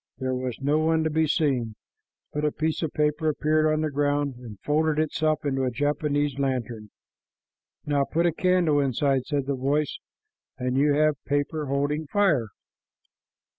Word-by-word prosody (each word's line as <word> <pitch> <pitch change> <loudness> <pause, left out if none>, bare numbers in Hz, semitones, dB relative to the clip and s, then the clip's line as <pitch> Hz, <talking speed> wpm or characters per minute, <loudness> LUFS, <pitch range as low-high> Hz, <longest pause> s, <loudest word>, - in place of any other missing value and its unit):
There 130 -1 -2
was 125 -2 -3
no 145 +3 +1
one 160 0 +2
to 160 - 0
be 160 +1 +2
seen, 135 -8 0 0.6
but 150 - -2
a 150 - +2
piece 160 +1 -2
of 160 -3 -2
paper 150 +1 +1
appeared 155 +1 +1
on 155 0 0
the 155 -1 -1
ground 145 0 0
and 115 -5 -11
folded 155 +1 +1
itself 155 0 0
into 135 -2 0
a 130 - +1
Japanese 145 +1 -1
lantern. 120 -5 -2 1.0
"Now 145 -2 +1
put 170 +4 0
a 170 - +2
candle 175 -4 +2
inside," 135 -1 +1
said 145 -3 -1
the 140 - -1
voice, 140 +3 -1 0.6
"and 125 0 -2
you 145 +1 +3
have 155 -1 +1
paper 145 +1 -1
holding 145 +3 -1
fire. 165 - +2
145 Hz, 165 wpm, -25 LUFS, 135-155 Hz, 1.0 s, you